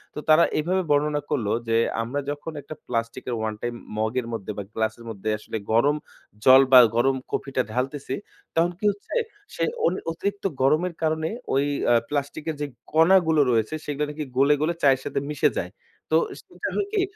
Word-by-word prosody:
তো - - -3
তারা 155 +2 +7 0.2
এভাবে 180 +5 +1
বর্ণনা 145 0 +2
করল 125 -8 0 0.2
যে, 115 - +1 0.3
আমরা 125 +5 -2
যখন 145 +3 -4
১ 140 - -12
টা - - -4
প্লাস্টিকের, 115 +1 -3
ওয়ান 110 0 -2
টাইম 120 0 -3 0.2
মগের 115 +3 -1
মধ্যে 105 -1 -4
বা 100 - -3
গ্লাসের 110 +1 -2
মধ্যে 110 -1 -4
আসলে 110 - -6
গরম 135 +7 +4 0.5
জল 130 +1 +9
বা 130 - +11 0.2
গরম 135 +3 +3 0.2
কফিটা 135 -2 -1
ঢালতেছি, 135 +3 -2 0.4
তখন 170 +2 +3
কি - - -18
হচ্ছে 200 0 -11 0.4
সে - - -1 0.2
অন - - +3 0.2
অতিরিক্ত 200 +4 -3 0.2
গরমের 155 +6 +2
কারণে 160 0 0 0.2
ওই 140 +2 +3 0.3
আ - - +6 0.2
প্লাস্টিকের 150 +2 -3
যে - - 0 0.3
কণাগুলো 160 -1 +5
রয়েছে, 110 +3 +1
সেগুলা 150 0 -1
নাকি 150 +1 -4
গলে, 140 +2 +5
গলে 165 +3 +1
চায়ের 135 -2 +5
সাথে - - -1
মিশে 150 - +2
যায়। - - -5 0.4
তো - - +7 0.2
সেটা - - -6
হয় 405 - 0
কি, 410 - +2
145 Hz, 180 wpm, -24 LUFS, 120-155 Hz, 0.5 s, বা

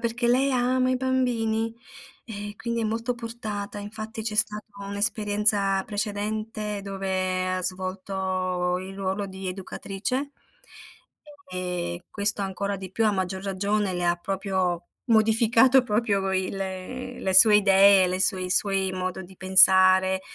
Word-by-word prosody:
perché 235 +1 -1
lei 260 +3 +3
ama 255 +1 +1
i 255 - +1
bambini 235 -4 -1 0.5
eh, 205 -2 -7
quindi 235 +1 -3
è - - -1
molto 230 +3 -2
portata. 220 -3 -6
Infatti 215 +2 -7
c'è 215 -1 -3
stata 210 0 +1 0.2
un'esperienza 205 -1 +1
precedente 210 0 -3
dove 190 -1 -2
ha 185 - -3
svolto 185 -1 -1
il 190 +1 -8
ruolo 195 +1 -3
di 190 0 -7
educatrice 200 +8 -4 1.2
e 180 -1 -4
questo 205 0 0
ancora 200 +1 -3
di 190 -1 -8
più, 225 +4 0
a 210 - +2
maggior 190 -1 -3
ragione, 200 0 -1
le 175 - -2
ha 175 0 +2
proprio 185 -1 -2 0.2
modificato 230 +3 +4
proprio 210 -4 0
il 190 0 -1
le 195 +3 -5
sue 210 +3 +8
idee, 195 -1 +6
le 185 +1 -2
sue 190 -1 +1
i 180 - -4
suoi 190 0 +1
modo 185 0 -4
di 190 +1 -15
pensare, 190 0 +5
200 Hz, 135 wpm, -25 LUFS, 190-220 Hz, 1.2 s, sue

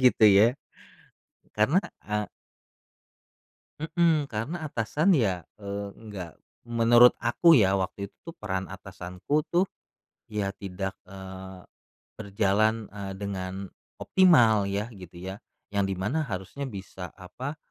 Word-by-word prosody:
gitu 125 -3 +6
ya, 105 +4 +6 1.0
karena 135 - +4 0.2
a 105 0 -2 1.5
Mhm, 160 -1 +2
karena 145 +10 -4
atasan 150 - +2
ya, 95 - +1 0.2
eee, 100 0 -5
nggak 100 -7 -8 0.3
menurut 120 +1 +6
aku 160 +8 +5
ya, 100 -6 +4
waktu 100 +1 -3
itu 165 0 -12
peran 95 - -3
atasanku 95 +9 -3
tuh, 180 +2 +1 0.6
ya 105 -2 -2
tidak, 95 -1 -5
eee, 95 0 -9 0.6
berjalan, 105 +2 +1
eee, 100 -2 -6
dengan 95 -1 -5 0.2
optimal 120 - +5
ya 105 +4 -2
gitu 90 -4 -12
ya, 95 +3 -7 0.3
yang 100 -1 +1
di 95 - -2
mana 105 - -1
harusnya 100 +8 -5
bisa 95 -4 -7
apa, 130 - -7
100 Hz, 115 wpm, -27 LUFS, 95-120 Hz, 1.5 s, gitu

